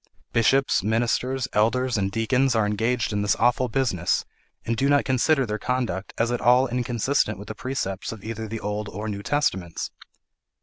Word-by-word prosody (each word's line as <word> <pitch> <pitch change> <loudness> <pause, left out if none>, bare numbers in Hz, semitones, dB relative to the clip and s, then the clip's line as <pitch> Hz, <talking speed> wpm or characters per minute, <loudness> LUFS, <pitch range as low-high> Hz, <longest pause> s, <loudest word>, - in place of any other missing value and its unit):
Bishops, 130 +4 +3
ministers, 120 +4 0
elders, 125 +4 +2
and 100 -2 0
deacons 120 +4 +1
are 110 -2 +3
engaged 115 +3 0
in 105 - 0
this 105 - +2
awful 120 +2 +2
business, 110 -8 0 0.4
and 115 - 0
do 135 +5 +1
not 145 -1 +3
consider 135 +2 +2
their 105 -1 -3
conduct 120 -6 -2
as 115 +1 +1
at 120 - -1
all 125 +2 +5
inconsistent 125 -1 0
with 100 - -10
the - - -3
precepts 110 -7 -3
of 110 -3 -9
either 110 0 -5
the 115 +1 -5
Old 105 0 -3
or 105 +3 -5
New 100 -2 -4
Testaments. 95 - -1
115 Hz, 175 wpm, -24 LUFS, 105-130 Hz, 0.4 s, all